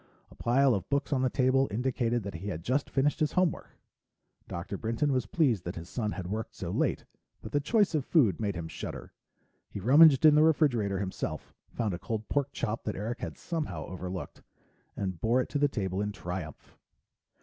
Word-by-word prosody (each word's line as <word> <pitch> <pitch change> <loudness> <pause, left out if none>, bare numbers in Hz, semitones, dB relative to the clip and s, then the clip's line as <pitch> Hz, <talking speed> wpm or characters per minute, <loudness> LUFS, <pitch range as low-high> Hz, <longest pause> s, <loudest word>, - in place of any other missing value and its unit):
A - - -15
pile 130 +2 +3
of 95 -3 -3
books 140 +1 0
on 130 - +1
the 130 - +2
table 130 +2 +2
indicated 120 0 0
that 100 0 -5
he 85 +5 -6
had 85 -5 -4
just 130 +8 0
finished 145 +3 +1
his 155 -2 +1
homework. 180 -4 0 0.7
Dr. 85 +3 -5
Brinton 115 +8 -1
was 130 -6 0
pleased 125 - +2
that 90 - -5
his 85 0 -7
son 110 -4 -2
had 95 - -5
worked 110 +4 -4
so - - -5
late, - - 0 0.4
but 110 - -7
the 145 - +2
choice 205 +5 +2
of 150 -4 +1
food 125 - +3
made 100 -4 -1
him 85 -1 -4
shudder. - - -7 0.6
He - - -6
rummaged 140 - +7
in 155 - +9
the 150 - +5
refrigerator 130 - +3
himself, 95 -1 -4 0.2
found 110 -5 -2
a 85 - -4
cold 110 +1 -4
pork 140 -1 +1
chop 115 -1 -3
that 105 - -2
Eric 115 +5 -4
had - - -6
somehow 150 - -4
overlooked, 90 0 -6 0.6
and 95 -4 -3
bore 120 +3 +3
it 130 - -1
to 145 - -1
the 145 - +4
table 95 -7 -2
in 105 0 -1
triumph. 90 -6 -7
115 Hz, 200 wpm, -29 LUFS, 95-140 Hz, 0.7 s, in